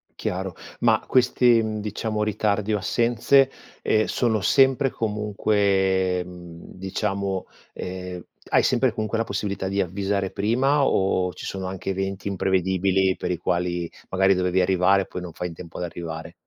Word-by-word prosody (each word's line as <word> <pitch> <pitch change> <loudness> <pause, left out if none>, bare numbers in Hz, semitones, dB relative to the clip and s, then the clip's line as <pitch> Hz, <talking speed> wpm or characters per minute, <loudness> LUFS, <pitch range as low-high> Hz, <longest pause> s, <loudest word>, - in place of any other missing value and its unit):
Chiaro 95 0 -3 0.2
ma 110 -2 +3
questi, 125 -2 +4
uhm, 110 -1 -2
diciamo, 105 +1 -2
ritardi 105 0 0
o 105 - +2
assenze, 120 +6 +3 0.3
ehm, 110 0 +2
sono 110 -4 0
sempre 135 +6 +4
e - - -3
comunque, 100 -4 +1
mhmm, 85 -2 -11
diciamo 95 0 -2 0.3
ehm, 90 -1 -6 0.3
hai - - +4
sempre - - +2
comunque 110 +1 -2
la 115 - 0
possibilità 100 -1 -3
di 100 +1 0
avvisare 95 +1 -1
prima 130 +7 +2
o 95 -5 +1
ci - - -9
sono 95 -1 -4
anche 95 0 -5
eventi 95 +1 -3
imprevedibili 95 0 +1
per - - -3
i 90 - 0
quali 85 0 -1 0.2
magari 95 +1 +3
dovevi 90 0 +1
arrivare, 95 +1 +3
poi 90 - -7
non 90 -2 -8
fai 90 +2 -4
in - - -9
tempo 80 0 -10
ad - - -3
arrivare? 80 -1 -6
95 Hz, 155 wpm, -24 LUFS, 90-110 Hz, 0.3 s, questi